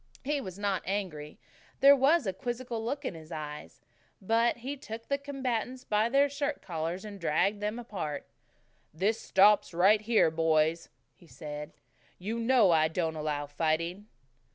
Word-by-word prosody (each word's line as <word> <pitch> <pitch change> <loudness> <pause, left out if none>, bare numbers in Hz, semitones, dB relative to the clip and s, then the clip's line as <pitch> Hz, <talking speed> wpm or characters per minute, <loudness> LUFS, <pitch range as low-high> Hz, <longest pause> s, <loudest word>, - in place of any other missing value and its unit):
He 290 +1 -1
was 185 -6 -8
not 200 -2 -1
angry. 175 -7 -4 0.4
There 280 +1 +8
was 280 +3 +3
a 190 - -1
quizzical 240 +2 -4
look 280 +5 -3
in - - -2
his 160 0 -12
eyes. 150 -2 -7 0.4
But 230 +4 +2
he 260 +5 -5
took 230 -4 -9
the 280 0 0
combatants 260 -3 -3
by 210 +2 +1
their 275 +3 +4
shirt 285 +1 -3
collars 170 +3 -4
and 205 -2 -8
dragged 195 +6 +1
them 210 +2 -2
apart. 185 -11 -5 0.7
"This 195 +8 0
stops 200 -2 +4
right 200 +5 +5
here, 215 -7 +3
boys," 160 0 +1 0.2
he 170 - -21
said. 150 -1 -8 0.5
"You 220 +6 -4
know 230 -5 +4
I 160 -1 +4
don't 160 0 -2
allow 150 -1 -2
fighting." 165 +6 -2
205 Hz, 155 wpm, -30 LUFS, 160-240 Hz, 0.7 s, There